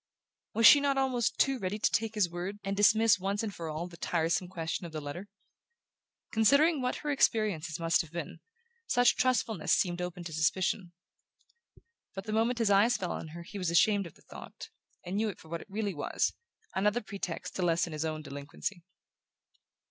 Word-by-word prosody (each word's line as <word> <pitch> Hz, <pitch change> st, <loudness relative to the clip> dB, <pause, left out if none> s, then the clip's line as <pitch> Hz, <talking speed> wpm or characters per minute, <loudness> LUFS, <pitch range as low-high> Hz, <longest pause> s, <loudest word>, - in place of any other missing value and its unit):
Was 230 Hz, +1 st, +4 dB
she 290 Hz, -, +10 dB
not 280 Hz, -1 st, +1 dB
almost 255 Hz, -4 st, 0 dB
too 270 Hz, -2 st, +2 dB
ready 190 Hz, +1 st, -2 dB
to 215 Hz, -, +1 dB
take 225 Hz, 0 st, -1 dB
his 205 Hz, -4 st, +3 dB
word, 175 Hz, +4 st, -5 dB
and 195 Hz, 0 st, -2 dB
dismiss 215 Hz, +1 st, +5 dB
once 200 Hz, +3 st, -1 dB
for 165 Hz, -1 st, -5 dB
all 155 Hz, +2 st, -4 dB
the 170 Hz, -1 st, -13 dB
tiresome 170 Hz, +2 st, 0 dB
question 165 Hz, -1 st, -4 dB
of -, -, -12 dB
the 155 Hz, -, -4 dB
letter? 150 Hz, +7 st, -7 dB, 1.0 s
Considering 280 Hz, +8 st, +4 dB
what 250 Hz, 0 st, -1 dB
her 295 Hz, -, +1 dB
experiences 200 Hz, -, +1 dB
must 165 Hz, 0 st, +2 dB
have 165 Hz, -, -11 dB
been, 170 Hz, 0 st, -6 dB, 0.5 s
such 245 Hz, 0 st, +4 dB
trustfulness 250 Hz, -4 st, +1 dB
seemed 175 Hz, -1 st, 0 dB
open 180 Hz, 0 st, -5 dB
to 165 Hz, -2 st, -7 dB
suspicion. 175 Hz, +3 st, 0 dB, 1.2 s
But 195 Hz, -, -5 dB
the 215 Hz, +1 st, -4 dB
moment 230 Hz, +3 st, +1 dB
his 225 Hz, -3 st, +2 dB
eyes 210 Hz, +5 st, +4 dB
fell 180 Hz, -4 st, -3 dB
on -, -, -5 dB
her 170 Hz, +2 st, -9 dB
he 200 Hz, +4 st, -8 dB
was 180 Hz, -3 st, -1 dB
ashamed 200 Hz, +3 st, +3 dB
of 165 Hz, -, -15 dB
the -, -, -22 dB
thought, -, -, -11 dB, 0.4 s
and 185 Hz, +3 st, -3 dB
knew 220 Hz, +1 st, +1 dB
it 195 Hz, -, -7 dB
for 160 Hz, -, -16 dB
what 170 Hz, 0 st, -4 dB
it -, -, -14 dB
really 205 Hz, 0 st, -2 dB
was: 145 Hz, -, -1 dB, 0.4 s
another 210 Hz, +5 st, +1 dB
pretext 200 Hz, -5 st, -6 dB
to -, -, -2 dB
lessen 170 Hz, -1 st, +1 dB
his 155 Hz, 0 st, -3 dB
own 155 Hz, -1 st, -3 dB
delinquency. 145 Hz, +6 st, -6 dB
195 Hz, 190 wpm, -30 LUFS, 170-220 Hz, 1.2 s, she